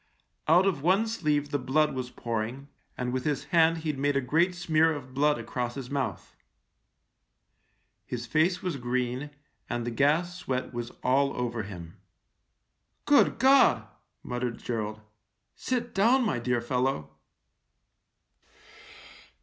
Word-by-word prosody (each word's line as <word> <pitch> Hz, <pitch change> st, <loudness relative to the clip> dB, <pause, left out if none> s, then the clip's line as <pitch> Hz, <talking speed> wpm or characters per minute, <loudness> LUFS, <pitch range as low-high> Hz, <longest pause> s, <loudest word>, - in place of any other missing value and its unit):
Out 175 Hz, +4 st, +5 dB
of 180 Hz, -8 st, 0 dB
one 190 Hz, +8 st, +3 dB
sleeve 150 Hz, -10 st, -1 dB
the 145 Hz, -, 0 dB
blood 150 Hz, +4 st, +1 dB
was 130 Hz, -1 st, -4 dB
pouring, 120 Hz, +4 st, -4 dB, 0.3 s
and 125 Hz, 0 st, -2 dB
with 130 Hz, -1 st, -1 dB
his 145 Hz, -3 st, -1 dB
hand 165 Hz, 0 st, +5 dB
he'd 150 Hz, -3 st, -2 dB
made 145 Hz, 0 st, +1 dB
a -, -, +4 dB
great 165 Hz, +8 st, +1 dB
smear 160 Hz, -2 st, +2 dB
of 135 Hz, -4 st, -7 dB
blood 145 Hz, +2 st, +2 dB
across 120 Hz, -1 st, -4 dB
his 135 Hz, -2 st, -7 dB
mouth. 140 Hz, -2 st, -3 dB, 1.7 s
His 120 Hz, -1 st, -4 dB
face 165 Hz, +9 st, +1 dB
was 180 Hz, -6 st, -2 dB
green, 125 Hz, +2 st, -2 dB, 0.4 s
and 120 Hz, -1 st, -2 dB
the 120 Hz, -, -2 dB
gas 155 Hz, +8 st, +1 dB
sweat 130 Hz, -9 st, -3 dB
was 120 Hz, 0 st, -4 dB
all 135 Hz, +2 st, +2 dB
over 120 Hz, -2 st, -2 dB
him. 90 Hz, -5 st, -9 dB, 1.1 s
"Good 290 Hz, -1 st, +4 dB
God!" 260 Hz, -, +5 dB, 0.4 s
muttered 125 Hz, -1 st, -3 dB
Gerald. 110 Hz, -2 st, -4 dB, 0.5 s
"Sit 240 Hz, -2 st, -3 dB
down, 235 Hz, +6 st, +4 dB
my 170 Hz, -, 0 dB
dear 120 Hz, 0 st, 0 dB
fellow." 125 Hz, -, -1 dB
135 Hz, 135 wpm, -28 LUFS, 120-165 Hz, 1.7 s, Out